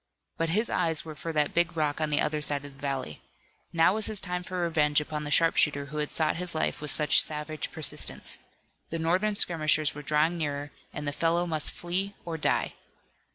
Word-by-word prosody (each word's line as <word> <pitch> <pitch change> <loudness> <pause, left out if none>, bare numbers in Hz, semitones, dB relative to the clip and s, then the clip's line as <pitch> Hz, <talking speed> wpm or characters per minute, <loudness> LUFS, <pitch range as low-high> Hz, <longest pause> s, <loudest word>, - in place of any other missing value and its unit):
But 165 0 -1
his 215 +7 +1
eyes 160 -2 +1
were 160 - -7
for 165 +3 -6
that 150 -2 0
big 170 0 0
rock 150 0 0
on 155 - 0
the 145 - +2
other 150 0 -1
side 145 -1 0
of 145 - -10
the 135 - -20
valley. 135 - -4 0.5
Now 165 +2 +4
was 215 0 0
his 215 -2 +1
time 180 -2 -3
for 180 0 -4
revenge 150 -3 +2
upon 150 0 -5
the - - -4
sharpshooter 150 -2 +3
who 150 +2 -6
had 150 - -2
sought 155 -1 0
his 180 -1 -3
life 155 - -1
with 150 - -4
such 150 0 +5
savage 150 -1 -2
persistence. - - +2 0.5
The 165 - -3
Northern 185 +6 +1
skirmishers 155 -5 +3
were 145 - -8
drawing 155 +4 +1
nearer 145 -1 -3 0.2
and 150 - -6
the - - 0
fellow 170 +3 +1
must 155 -3 +2
flee 190 +3 -3
or 170 -1 -4
die. 160 - 0
155 Hz, 205 wpm, -28 LUFS, 150-170 Hz, 0.5 s, such